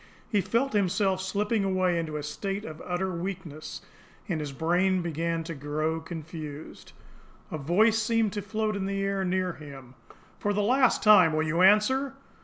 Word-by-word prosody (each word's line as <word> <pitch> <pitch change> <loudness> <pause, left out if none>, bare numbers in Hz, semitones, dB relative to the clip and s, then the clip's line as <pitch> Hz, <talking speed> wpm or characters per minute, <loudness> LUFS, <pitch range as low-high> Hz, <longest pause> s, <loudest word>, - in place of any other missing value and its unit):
He 205 -3 +3
felt 230 +8 0
himself 195 -1 +1
slipping 205 +3 0
away 185 -2 +1
into 155 -2 -3
a 150 - -5
state 195 +7 -4
of 155 0 -8
utter 185 +1 -2
weakness, 170 -4 -6 0.4
and 175 -6 -1
his 150 -2 -4
brain 180 +5 +1
began 165 0 -2
to 165 +1 -6
grow 155 +2 -2
confused. 160 -2 -8 0.6
A 155 - -3
voice 215 +10 +3
seemed 225 -2 +1
to 205 - -3
float 215 +2 -2
in 195 -1 -2
the 195 0 -2
air 195 -1 0
near 185 -1 0
him: 135 -5 -11 0.5
"For 205 - 0
the 205 0 +1
last 255 +3 +3
time 195 -7 +7
will 155 0 +1
you 165 +3 +1
answer?" 260 +8 +4
185 Hz, 170 wpm, -27 LUFS, 160-205 Hz, 0.6 s, time